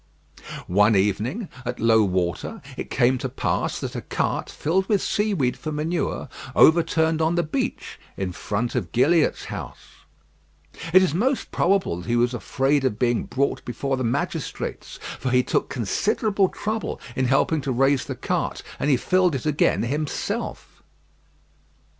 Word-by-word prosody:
One 105 +4 +4
evening, 105 - 0 0.2
at 125 0 -4
low 110 -1 +5
water, 95 - -2
it - - -6
came 125 0 +2
to - - -3
pass - - -1
that - - -5
a - - -3
cart - - -2
filled 185 +5 -1
with 205 -2 +3
seaweed 185 - 0
for 155 - -5
manure 155 +1 -2 0.3
overturned 160 -1 +4
on 160 +2 +2
the 175 - +2
beach, 155 - -3 0.2
in 95 -2 -2
front 110 +6 -2
of 105 -10 -2
Gilliatt's 150 +6 +3
house. - - -9 0.8
It 185 +2 +7
is 180 - +1
most 250 - 0
probable 190 - +1
that 90 - -9
he 120 - +2
was 120 +1 +2
afraid 135 +4 0
of 130 -6 0
being 120 -1 +1
brought 140 +1 -1
before 135 +2 -2
the 130 - -3
magistrates, 115 0 -3 0.2
for 130 - -2
he 125 0 +3
took - - 0
considerable 195 - +1
trouble 220 +1 -3 0.2
in 130 - +1
helping 140 +4 +2
to 135 -1 -2
raise 135 +1 +2
the - - -5
cart, - - -2 0.2
and 140 - 0
he 135 - +4
filled 185 +3 +2
it 130 - -4
again 150 -5 +2
himself. 145 +5 -3
135 Hz, 155 wpm, -24 LUFS, 120-170 Hz, 0.8 s, It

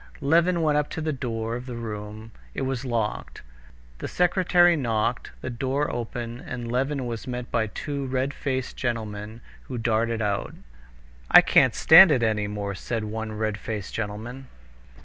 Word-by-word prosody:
Levin 170 +4 +3
went 150 -1 +3
up 150 - -2
to - - -5
the 155 -1 -1
door 115 -3 -3
of 125 +2 -7
the 125 - -5
room; 110 -1 -7 0.2
it - - -2
was 130 -1 -2
locked. 110 - -3 0.6
The - - -4
secretary 175 -1 +3
knocked, 120 -4 -1
the 130 - -4
door 135 +4 -1
opened, 120 0 -5
and 120 -1 -5
Levin 135 +2 -1
was 115 0 -5
met 125 -1 -5
by 110 -2 +1
two 140 +5 -4
red 130 +2 -1
faced 130 -2 -3
gentlemen, 110 -2 -4 0.2
who 125 - -5
darted 115 0 0
out. 100 -2 -2 0.7
"I - - +10
can't - - +4
stand 165 +2 +8
any 110 -6 +1
more 105 -1 -4
of 95 - -7
it," - - -12
said 115 -2 -2
one 110 +1 -4
red 110 -1 -2
faced 105 -4 -5
gentleman. 115 +5 -5
120 Hz, 170 wpm, -25 LUFS, 110-135 Hz, 0.7 s, I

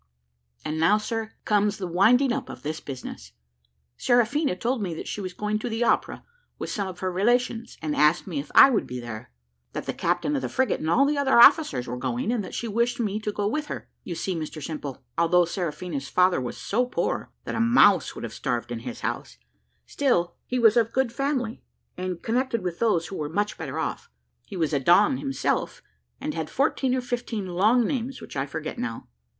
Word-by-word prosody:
And 155 +1 -2
now, 170 +6 +5
sir, 220 0 -4
comes 210 -1 +2
the 195 - -4
winding 230 +9 +4
up 270 -1 -4
of - - -9
this 155 +2 -3
business. 130 -3 -8 0.6
Seraphina 245 - +2
told 235 +5 -1
me 180 -5 -3
that - - -7
she 210 - -4
was 185 -2 -6
going 210 0 -1
to 240 - -4
the 225 +1 -1
opera - - +1 0.3
with - - -5
some 200 -2 -2
of 185 -1 -8
her 185 -1 -1
relations, 230 +4 0
and 150 -1 -1
asked 150 +3 +3
me 165 -7 -3
if 140 - -6
I 275 - +9
would 230 - 0
be 125 0 -5
there; 120 -3 -7 0.4
that - - -4
the - - -2
captain 175 - 0
of 275 - -1
the - - -3
frigate, 260 -1 +1
and 155 - -2
all 260 +11 +4
the 290 0 +1
other 265 -3 +4
officers 235 - +6
were 125 0 -5
going, 125 - -1
and 235 -4 0
that 185 - -8
she 235 - -3
wished 235 +3 0
me 210 -2 -1
to 210 -1 -3
go 205 0 -1
with 295 +7 -2
her. - - -7
You 175 - -5
see, 185 +2 -2
Mr 155 -1 -5
Simple, 150 -3 -6 0.2
although 175 +1 +4
Seraphina's 170 -4 -4
father 180 -5 +3
was 125 - -5
so 245 +5 0
poor, - - -2
that - - -5
a - - -2
mouse 235 +2 +5
would - - -7
have - - -5
starved - - -3
in - - -3
his - - -7
house, - - -4 0.5
still 175 -12 +1
he 250 - -1
was 230 -1 +5
of 230 -1 +2
good 260 -3 +1
family, 260 -4 -2 0.3
and 185 -1 -4
connected 235 -2 0
with 175 -2 -3
those 200 -8 +2
who 195 - -6
were 150 -1 -3
much 205 +6 -1
better - - -6
off. 470 - -3 0.4
He 200 - -7
was 160 -2 0
a 140 - +2
Don 195 - +5
himself, 270 0 -2 0.4
and - - -3
had - - -4
fourteen 260 -2 +1
or 255 - 0
fifteen 240 -4 -3
long 210 +7 +3
names, 260 0 -2
which - - -10
I 135 +1 -1
forget 155 +2 -5
now. 115 -2 -4
205 Hz, 215 wpm, -25 LUFS, 170-245 Hz, 0.6 s, I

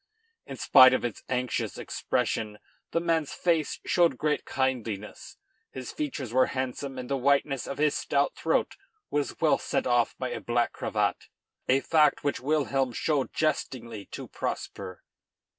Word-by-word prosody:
In - - -7
spite 130 0 +8
of - - -2
its 120 - -4
anxious 125 -1 -1
expression 105 -1 -2 0.3
the 165 - 0
man's 165 -3 0
face 165 -4 0
showed 170 -7 +3
great 150 +2 -1
kindliness. 115 -6 -3 0.3
His 130 -2 -7
features 135 -5 -4
were 130 0 +4
handsome; 130 +1 -3
and 125 -1 -5
the 140 - 0
whiteness 140 0 +1
of 140 - -5
his 150 0 +2
stout - - +1
throat - - 0 0.4
was 145 -1 -1
well 155 -2 +3
set 135 - -1
off 120 -2 +2
by 130 - -3
a - - -5
black 120 0 +1
cravat, - - -1 0.4
a 135 +1 +4
fact 155 -1 +3
which 145 - 0
Wilhelm 135 -2 0
showed 145 +1 0
jestingly 120 -8 -2
to - - -8
Prosper." 90 -1 -5
130 Hz, 150 wpm, -28 LUFS, 125-150 Hz, 0.4 s, spite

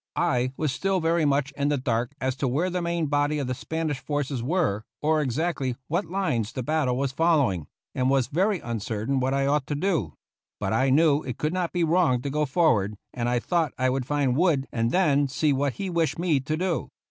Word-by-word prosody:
I 125 +1 +1
was 155 -3 0
still 195 +6 0
very 165 -1 +2
much 140 0 +1
in 140 0 -1
the 145 - +1
dark 120 0 -1
as 130 -1 -1
to 135 - 0
where 160 +9 0
the 180 0 -1
main 170 -1 -1
body 145 +1 +1
of 140 - -1
the 125 - -2
Span 160 +4 -3
ish 140 - -3
forces 145 -4 -2
were, 130 - 0 0.2
or 155 +1 +2
exactly 140 -1 -1
what 175 +6 0
lines 145 - -1
the 130 - -4
battle 145 -3 0
was 135 -1 0
following, 135 - +2 0.3
and 130 0 +1
was 135 -2 +3
very 190 - +1
uncertain 115 +3 -2
what 130 +1 0
I 140 0 +1
ought 140 -1 +1
to 145 - -2
do; 145 - -1 0.4
but 95 - -1
I 130 +4 +2
knew 150 +1 +4
it 125 -5 -6
could 150 +2 -1
not 180 -2 -1
be 175 -1 0
wrong 165 -6 +3
to 140 - -3
go 150 +1 0
forward, 125 - +2 0.2
and 120 -1 -1
I 120 - +1
thought 160 +4 0
I 130 0 +2
would 130 -1 -2
find 140 -4 +1
Wood 150 -4 +2
and 115 0 0
then 145 -4 +3
see 145 +2 +1
what 135 0 0
he 200 - -4
wished 170 -3 0
me 165 -4 +2
to 155 +4 -2
do. 180 -1 -1
145 Hz, 225 wpm, -26 LUFS, 130-165 Hz, 0.4 s, knew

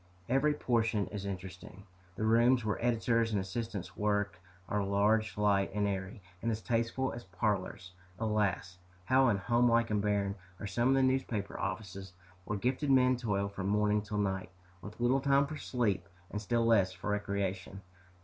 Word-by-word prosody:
Every 135 +4 +2
portion 115 -6 +1
is 100 0 -5
interesting. 95 0 -8 0.3
The 105 - -3
rooms 120 +2 +4
where 105 +1 -2
editors 115 -1 +2
and 105 - +1
assistants 95 -1 -5
work 105 0 0 0.3
are 105 -1 0
large, 105 +1 +1
light, 100 -2 +2
and 105 -1 +1
airy, 95 0 -4 0.2
and 115 - -1
as 110 -1 -1
tasteful 115 +3 -1
as 120 -2 -8
parlors. 95 -1 -2 0.2
Alas! 105 -4 -1 0.3
how 130 +4 +4
unhomelike 115 +2 +2
and 105 -1 +1
barren 100 -1 0 0.3
are - - -6
some 120 +6 +1
of 135 - +4
the 135 - +3
newspaper 130 -6 0
offices, 95 -1 -5 0.3
where 105 - -2
gifted 130 +7 -1
men 130 -1 +5
toil 100 -5 -1
from 100 -1 -5
morning 105 +1 +2
till 105 0 -5
night, 95 -2 -1 0.3
with 105 +4 -10
little 125 +3 +2
time 140 +1 +3
for 155 +2 -6
sleep, 100 -10 -1 0.2
and 105 - -3
still 115 +2 +1
less 100 -5 +4
for 95 +3 -4
recreation. 100 -2 -3
105 Hz, 165 wpm, -32 LUFS, 100-120 Hz, 0.3 s, men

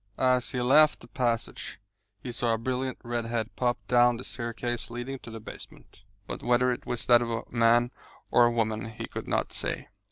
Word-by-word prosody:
As 125 -1 +2
he 130 - -2
left 145 +5 +5
the - - -12
passage 120 -2 -2 0.4
he 125 - -4
saw 115 -1 +1
a - - -3
brilliant 130 +2 -2
red 120 -1 -2
head 115 -1 -3
pop 120 -1 +1
down 120 -1 +5
the 125 - -7
staircase 120 0 -4
leading 120 +3 -5
to - - -11
the 115 0 -7
basement; 105 - -11 0.2
but - - -6
whether 125 +1 +3
it 125 - -5
was 120 - -2
that 120 -1 +6
of 120 - -2
a 115 0 -2
man 120 +1 +4 0.4
or 120 - +6
a 120 - +3
woman 110 -1 -1
he 110 - -6
could - - -7
not - - -1
say. - - -3
120 Hz, 200 wpm, -28 LUFS, 115-125 Hz, 0.4 s, that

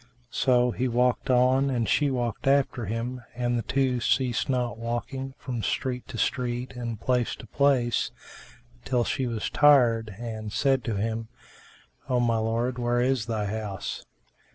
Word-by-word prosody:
So 125 -2 +3
he 130 +2 -1
walked 125 +2 +1
on 130 +2 +4
and 120 -4 0
she 145 -1 +2
walked 120 -2 -2
after 135 -4 +2
him, 120 +4 -3
and 120 0 0
the 120 - 0
two 130 +1 0
ceased 125 +1 +1
not 125 -3 -1
walking 130 +3 -4
from 120 -3 -4
street 125 +1 -2
to 125 - -7
street 125 +1 -1
and 115 -3 -4
place 125 0 0
to - - -12
place, 125 -1 +2 0.7
till 125 -2 +1
she 130 +2 -1
was 115 -3 -2
tired 115 -7 +4
and 110 -2 -5
said 135 +1 +2
to 115 - -1
him, 110 +2 -2 0.8
"O 125 -1 +2
my 120 -1 +2
lord, 115 +3 -1
where 120 0 +1
is 125 -2 +1
thy 110 -3 -1
house?" 105 -2 -4
120 Hz, 155 wpm, -27 LUFS, 115-130 Hz, 0.8 s, on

